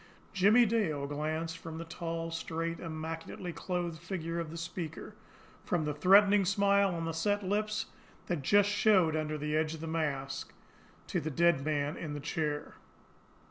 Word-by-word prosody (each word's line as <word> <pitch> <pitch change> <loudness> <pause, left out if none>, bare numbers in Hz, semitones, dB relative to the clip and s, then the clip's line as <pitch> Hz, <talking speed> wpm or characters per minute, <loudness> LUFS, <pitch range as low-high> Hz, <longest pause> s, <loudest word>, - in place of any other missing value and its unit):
Jimmie 210 +6 +6
Dale 195 -11 0
glanced 155 +3 -3
from 160 -1 -7
the 165 - -6
tall, 165 0 -4
straight, 165 +1 -3
immaculately 165 +2 -5
clothed 175 -3 -3
figure 170 -1 -3
of 165 -2 -3
the 165 - -7
speaker, 165 -1 -6 0.5
from 170 -3 0
the 150 - -1
threatening 195 +6 +6
smile 200 0 +3
on 165 0 -3
the 165 - -1
set 205 +5 0
lips 215 +3 0 0.4
that 175 -5 -2
just 205 +8 +4
showed 195 -6 +4
under 155 -1 -1
the 150 +1 -2
edge 155 0 +1
of - - -10
the 165 - -5
mask, 140 -4 -3 0.5
to - - -1
the 155 - -3
dead 170 -1 +3
man 150 +1 -1
in 155 -3 -5
the - - -4
chair. 150 0 -2
165 Hz, 165 wpm, -32 LUFS, 155-190 Hz, 0.5 s, Jimmie